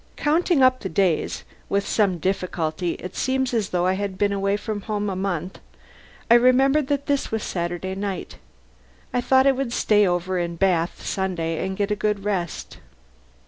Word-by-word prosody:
Counting 315 -1 +2
up 255 0 +4
the 190 - -5
days 180 -2 0 0.3
(with 200 0 0
some 200 -5 +2
difficulty: 175 -2 -2
it 180 - -8
seemed 265 -1 0
as 220 -4 0
though 180 -1 0
I 185 - +3
had 195 -1 -3
been 205 0 +1
away 200 0 0
from 210 -1 -4
home 210 0 -2
a - - -3
month), 185 -1 -3 0.7
I - - +6
remembered 260 +4 +4
that 285 -1 -1
this 280 -1 -1
was 220 -1 -2
Saturday 175 +1 -3
night. 195 -1 -5 0.7
I 245 - +1
thought 260 +2 +4
I 275 - +6
would 265 -2 -2
stay 210 -3 +3
in 175 -1 -1
Bath 175 -2 +1
over - - -14
Sunday 170 -4 -2
and 190 0 -3
get 205 0 -1
a - - +2
good 205 -1 -1
rest. 185 -5 -3
200 Hz, 180 wpm, -23 LUFS, 180-240 Hz, 0.7 s, I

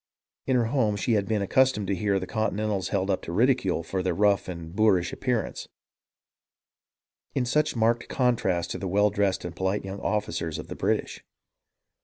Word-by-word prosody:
In 130 - +2
her 120 -2 +3
home 110 -4 +1
she 100 +4 -1
had 105 -3 +2
been 105 -2 0
accustomed 130 -1 +2
to 95 - 0
hear 100 +1 +1
the 90 - -4
Continentals 105 -3 -1
held 100 -1 0
up 95 - -1
to - - -7
ridicule 110 -4 +2
for 95 +3 -2
their 90 -2 -1
rough 100 +1 +2
and 85 -1 -7
boorish 95 -5 +3
appearance, 125 -4 -2 1.7
in 130 -3 +1
such 150 +4 +1
marked 115 +1 +1
contrast 95 -9 +1
to - - -4
the 95 - -3
well 105 +3 +3
dressed 100 -3 0
and 85 -1 -6
polite 95 +2 -1
young 95 +1 -6
officers 85 -7 -2
of - - -8
the - - -5
British. - - -1
100 Hz, 180 wpm, -26 LUFS, 95-115 Hz, 1.7 s, her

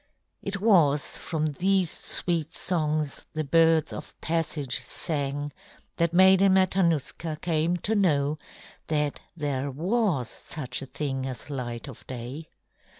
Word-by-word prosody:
It 200 0 -3
was 165 -9 +3
from 155 -3 -2
these 180 +3 +2
sweet 165 -3 0
songs 155 -4 0
the 155 -1 -1
birds 160 +1 +3
of - - -9
passage 155 -5 -1
sang 145 -2 -2 0.4
that 170 -1 +2
Maiden 190 +2 +6
Matanuska 170 -4 +1
came 165 +1 +1
to 220 - +2
know 155 -7 +2 0.5
that 150 -2 0 0.2
there 140 -2 -1
was 170 - 0
such 140 +1 -4
a 135 - -7
thing 135 -2 -3
as 130 +3 -7
light 120 -2 -4
of 135 - -11
day. 130 +5 -6
155 Hz, 125 wpm, -27 LUFS, 140-175 Hz, 0.5 s, Maiden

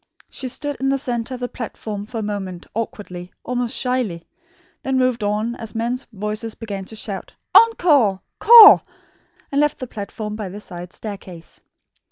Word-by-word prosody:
She 260 - -5
stood 290 +3 -5
in 270 - 0
the 275 - +2
centre 250 -1 -3
of 250 - -10
the 245 - -1
platform 215 -4 -6
for 230 - -7
a - - -1
moment, 195 -4 -5
awkwardly, 185 -5 -5
almost 245 -1 -2
shyly; 240 -10 -2 0.5
then 265 0 -1
moved 255 -3 +1
on 210 +3 0
as 225 0 -8
men's 240 +3 -2
voices 215 +2 -4
began 200 -4 -6
to 220 - -10
shout 200 -3 -6 0.2
"Encore! 295 - +5 0.2
'core!" 460 -3 +10 0.7
and 280 +1 +2
left 295 0 +1
the 255 - -5
platform 210 -1 -6
by 210 -3 -5
the 200 +3 -8
side 175 -3 -9
staircase. 190 -6 -9
225 Hz, 165 wpm, -21 LUFS, 205-255 Hz, 0.7 s, core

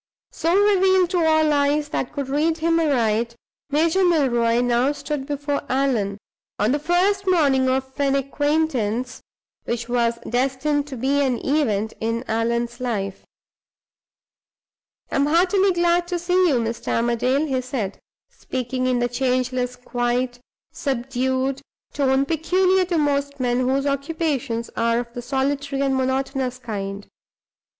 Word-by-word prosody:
So 335 +4 +1
revealed 380 -3 +4
to 355 -3 +2
all 315 -1 +3
eyes 290 +1 +1
that 260 - -2
could 280 -2 -4
read 305 +4 +1
him 330 +1 +2
aright, 235 -6 +1 0.3
Major 325 +6 +2
Milroy 240 -9 +2
now 245 +3 +2
stood 290 -2 -4
before 285 0 -2
Allan, 245 -7 0 0.4
on 210 +3 +2
the 290 - +1
first 375 +5 +1
morning 280 -8 +3
of 265 0 -1
an 275 -1 +2
acquaintance 275 -4 -1 0.4
which 235 0 -3
was 235 -1 +1
destined 270 +4 0
to 270 -3 -7
be 275 +4 +1
an 260 -3 +1
event 220 -8 0
in 230 +2 -1
Allan's 235 +2 -1
life. 205 -6 -3 1.9
"I - - 0
am 280 +1 +2
heartily 375 +5 +3
glad 345 0 +2
to 355 0 -1
see 360 +1 +2
you, 295 - +3
Mr. 230 -1 -2
Armadale," 240 +5 +1
he 265 -4 -1
said, 245 -6 -4 0.3
speaking 255 0 -3
in 255 -1 +2
the 240 0 +1
changeless 250 0 -1
quiet, 245 0 -2 0.3
subdued 260 -1 -1 0.3
tone 270 -1 +2
peculiar 365 +4 +2
to 350 -1 -1
most 285 -1 0
men 245 -1 +1
whose 265 +2 +1
occupations 280 -4 -2
are 230 0 +1
of 235 0 -4
the 245 - -5
solitary 275 +2 -1
and 270 -1 +1
monotonous 260 0 -1
kind. 200 -4 -5
270 Hz, 140 wpm, -22 LUFS, 245-300 Hz, 1.9 s, revealed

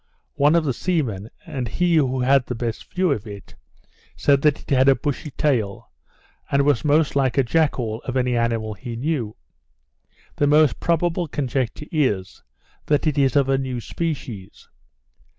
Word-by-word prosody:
One 145 +3 +3
of 170 - +3
the 140 -4 0
seamen, 120 - -2 0.2
and 130 -4 -4
he 175 +6 +1
who 130 -3 +1
had 130 0 +3
the 125 - -3
best 115 -1 -5
view 185 -2 +1
of 110 -6 -2
it, 100 -2 -10 0.6
said 140 -1 +2
it 150 - 0
had 135 0 +4
a 135 - +6
bushy 150 +3 -3
tail, 125 -9 -1 0.6
and 140 0 +2
was 145 -4 +2
the - - -3
most 150 0 +2
like 135 -1 +1
a 135 - +5
jackall 120 -6 0
of 130 0 -2
any 125 -1 +1
animal 115 -2 -1
he 115 +4 -7
knew. 120 -4 -2 1.0
The 145 - +2
most 150 -5 +4
probable 170 0 0
conjecture 135 -1 -2
is, 115 - -1 0.5
that 150 +1 +2
it 150 -2 +1
is 135 0 +2
of 140 -2 +3
a 135 0 +2
new 130 -2 -3
species. 125 - -6
135 Hz, 170 wpm, -22 LUFS, 120-150 Hz, 1.0 s, a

